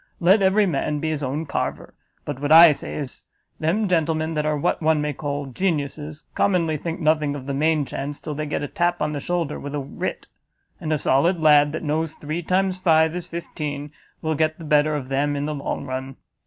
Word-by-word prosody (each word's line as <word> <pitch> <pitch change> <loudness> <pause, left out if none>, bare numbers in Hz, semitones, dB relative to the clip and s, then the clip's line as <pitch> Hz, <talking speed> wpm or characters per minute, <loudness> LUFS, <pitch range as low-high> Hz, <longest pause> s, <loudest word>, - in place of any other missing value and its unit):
Let 190 +4 +5
every 195 +2 +4
man 150 -3 -1
be 155 +1 -1
his 150 -2 -2
own 145 +4 -2
carver; 140 - -3 0.3
but 145 -3 -4
what 145 +1 -1
I 165 0 +10
say 145 - -5
is, 140 -3 -7 0.3
them 185 +7 +1
gentlemen 160 -2 +1
that 150 -1 -1
are 150 -1 +1
what 145 - 0
one 160 -1 +3
may 150 0 -1
call 145 0 -3
geniuses, 150 0 -3
commonly 170 -5 +1
think 165 +4 -4
nothing 155 -3 +2
of 135 -2 -7
the 140 - -3
main 155 +1 +2
chance, 140 +2 -5
till 150 - -5
they 155 +1 -3
get 145 - -2
a - - -2
tap 175 -1 0
on 150 - 0
the 145 - -2
shoulder 170 -1 -2
with 145 +1 -6
a - - -1
writ; 135 - -5 0.5
and 155 - -4
a 155 - +2
solid 155 +6 +2
lad, 150 -2 +5
that 160 - -4
knows 155 +1 -1
three 155 +3 -4
times 185 +2 0
five 160 -2 +3
is 180 - -5
fifteen, 150 -3 -5 0.3
will 160 0 0
get 155 +1 0
the 165 - -9
better 150 0 +3
of 135 -3 -5
them 145 +2 0
in 145 0 -2
the 155 - -2
long 140 -1 -4
run. 130 0 -5
155 Hz, 220 wpm, -23 LUFS, 145-165 Hz, 0.5 s, I